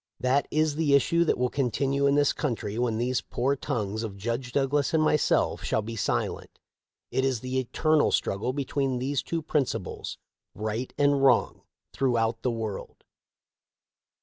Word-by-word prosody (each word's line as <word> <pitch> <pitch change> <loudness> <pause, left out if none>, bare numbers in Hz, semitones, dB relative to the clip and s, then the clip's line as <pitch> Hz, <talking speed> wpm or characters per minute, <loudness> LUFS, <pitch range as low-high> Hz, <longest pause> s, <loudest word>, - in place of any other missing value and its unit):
That 130 +3 +2
is 155 0 +1
the 150 -3 +3
issue 170 +4 +3
that - - +1
will 125 0 0
continue 140 +1 +1
in 140 - +3
this 145 -1 +3
country 115 -6 -3
when 120 -3 0
these 125 +2 0
poor 135 +3 -1
tongues 110 -7 -3
of 105 -4 -5
Judge 120 +5 -3
Douglas 140 +3 +1
and 155 - +3
myself 150 -1 +2
shall 110 - 0
be 115 +2 -6
silent. 110 - -2 0.5
It 130 - +1
is 130 -4 0
the 130 +1 -1
eternal 155 +4 +2
struggle 100 +6 0
between 135 -1 -1
these 135 +2 -1
two 165 -1 -3
principles 135 - -2 0.2
— - - -59
right 115 +4 -3
and 145 -1 +3
wrong 135 - +3 0.2
— - - -60
throughout 115 -3 +1
the 125 - 0
world. 110 -4 -5
130 Hz, 165 wpm, -27 LUFS, 115-140 Hz, 0.5 s, the